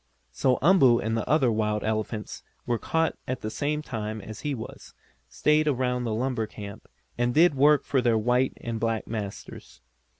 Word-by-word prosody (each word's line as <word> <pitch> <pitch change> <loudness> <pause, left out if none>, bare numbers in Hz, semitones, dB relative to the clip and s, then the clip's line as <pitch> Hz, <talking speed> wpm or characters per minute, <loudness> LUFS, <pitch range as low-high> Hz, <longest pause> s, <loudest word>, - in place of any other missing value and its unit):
So 130 -1 +1
Umboo 140 -9 +6
and 110 0 -1
the 115 - -3
other 140 -5 +3
wild 105 -1 0
elephants 110 0 -3 0.2
who - - -4
were 120 - +1
caught 160 0 -1
at 130 0 -3
the 110 - -4
same 150 +5 -2
time 110 -4 -4
as 110 +2 -9
he 145 -2 -2
was, 110 - -10 0.3
stayed 150 0 +2
around 125 -3 0
the 115 - -1
lumber 120 -2 -1
camp, 100 0 -10 0.3
and 120 0 +1
did 170 +1 +6
work 145 +1 +4
for 135 - +1
their 120 -3 +2
white 125 +4 +1
and 115 -1 -4
black 115 -1 -1
masters. 105 -3 -7
120 Hz, 180 wpm, -26 LUFS, 110-140 Hz, 0.3 s, Umboo